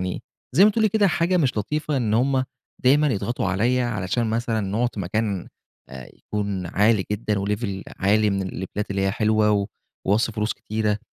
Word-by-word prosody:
يعني، 90 0 -3 0.3
زي 195 - +7
ما 215 - +6
تقولي 220 0 +2
كده 205 0 +3
حاجة 170 +2 +1
مش 135 -9 +1
لطيفة 150 +7 -1
إن 110 -4 0
هُم 130 +2 +2 0.4
دايمًا 145 +4 +5
يضغطوا 120 -2 -1
عليَّ 115 +7 +1
علشان 115 0 -1
مثلًا 115 -1 0
نقعد 105 +5 0
في 105 - -4
مكان 100 0 -2 0.4
آآ 65 -1 -10
يكون 100 -3 -3
عالي 105 +2 +2
جدًا 105 -1 -1
وlevel 100 -2 -2 0.2
عالي 105 +2 +3
من 100 0 -1
الليفيلات 95 +2 -5
اللي 100 -1 0
هي 95 - +2
حلوة، 110 0 +2
و 100 -1 +1 0.4
واصرف 105 +3 +2
فلوس 105 +1 0
كتيرة، 105 -1 -2
105 Hz, 180 wpm, -23 LUFS, 100-120 Hz, 0.4 s, زي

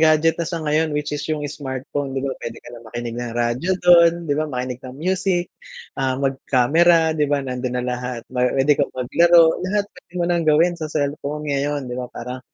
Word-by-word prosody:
gadget 160 0 +4
na 165 - -2
siya 165 -3 -4
ngayon 150 0 +1
which 150 0 -3
is 145 - -2
yung 155 -1 -2
smartphone, 135 -1 -4
'di 135 - -2
ba 135 - -1
pwede 115 -1 -6
ka - - -13
na 120 - -10
makinig 120 0 -5
ng 120 -1 -5
radyo 120 +9 0
dun 170 -1 +7
'di 145 - -1
ba 155 +1 -1
makinig 125 -1 -4
ng 130 0 -10
music, 180 +1 -1 0.5
ah, 130 -1 0
mag-camera, 145 +5 +3
'di 150 -2 0
ba? 145 -1 0
Nandun 125 -1 -3
na 125 - -2
lahat 125 -1 -4
pwede 135 +3 +2
kang 140 - +1
maglaro 165 +6 +4
lahat 200 +2 0
pwede 180 -1 -19
mo 175 - 0
ng 170 -1 0
gawin 165 +4 +4
sa 155 - -3
cellphone 150 0 -3
ngayon, 140 0 -1
'di 125 0 -5
ba, 125 - -6
parang 125 +2 -7
145 Hz, 205 wpm, -21 LUFS, 125-160 Hz, 0.5 s, dun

